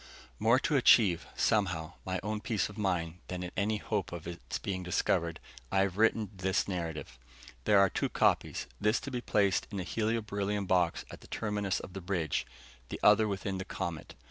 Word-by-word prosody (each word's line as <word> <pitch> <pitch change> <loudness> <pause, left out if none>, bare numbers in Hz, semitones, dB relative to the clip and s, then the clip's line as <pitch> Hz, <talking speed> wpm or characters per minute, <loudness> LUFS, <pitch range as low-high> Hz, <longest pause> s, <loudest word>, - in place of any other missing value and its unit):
More 115 +3 +5
to 150 - +1
achieve, 105 -9 +5
somehow, 85 -7 +1
my 95 0 -1
own 105 0 -2
peace 110 -7 0
of 105 - -11
mind, 90 -4 -1
than 90 -1 -4
in 90 - -5
any 105 +1 +1
hope 105 -3 -2
of 85 -2 -7
its 85 0 -5
being 95 -2 -3
discovered, 85 -1 0 0.3
I 95 - +3
have 95 -2 0
written 110 -1 +2
this 95 +1 0
narrative. 80 -8 -4 0.5
There 105 - +5
are 100 0 +7
two - - -1
copies, - - +1
this 105 +2 +2
to 140 - -6
be 125 -1 -2
placed 100 -5 +2
in 100 - -4
a - - -2
helio 110 +4 -1
beryllium 100 -1 -2
box 90 -2 +1
at - - -10
the - - -14
terminus 105 -3 -1
of 95 - -9
the 95 - -6
bridge, 85 -5 -1 0.4
the - - -5
other 105 +1 +6
within 95 -1 -3
the 95 - -4
comet[TN 85 -4 -4
3]. - - -13
95 Hz, 195 wpm, -31 LUFS, 90-105 Hz, 0.5 s, are